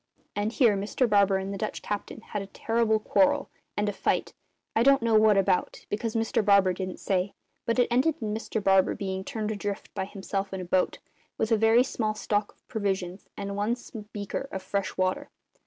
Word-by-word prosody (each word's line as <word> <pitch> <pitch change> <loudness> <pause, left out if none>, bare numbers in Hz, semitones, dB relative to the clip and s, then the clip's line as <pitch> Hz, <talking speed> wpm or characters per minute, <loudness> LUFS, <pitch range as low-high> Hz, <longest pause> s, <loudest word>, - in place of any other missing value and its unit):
And 205 +1 0
here 235 -4 +4
Mr 205 +6 0
Barber 200 -2 +4
and 190 +1 -4
the 195 - -5
Dutch 215 - -3
captain 205 +1 -4
had 210 -2 -4
a 195 - -7
terrible 225 +2 +1
quarrel 285 +6 +2 0.3
and 210 0 +1
a 205 - 0
fight 190 - 0 0.4
I 225 - +4
don't 275 0 +5
know 230 -1 +2
what 215 -1 +6
about, 190 -2 +1
because 220 +2 -2
Mr 225 -1 +1
Barber 200 -2 +5
didn't 185 0 -5
say, 190 0 -1 0.3
but 230 - +1
it 245 - +4
ended 265 +6 +3
in 215 -2 -2
Mr 220 -1 -3
Barber 195 -1 +4
being 190 -2 -3
turned 215 +1 -3
adrift 205 -1 -4
by 190 -2 -2
himself 195 0 -4
in 190 - -3
a - - -5
boat, 180 +1 +1 0.4
with 220 - -1
a 225 +2 +5
small 215 -5 -2
stock 205 -1 -1
of - - -40
provisions 195 -4 -3
and 200 0 -4
one 210 +4 +1 0.4
breaker 205 +6 -4
of 190 -1 -5
fresh 200 0 -2
water. 185 0 0
205 Hz, 195 wpm, -27 LUFS, 195-225 Hz, 0.4 s, what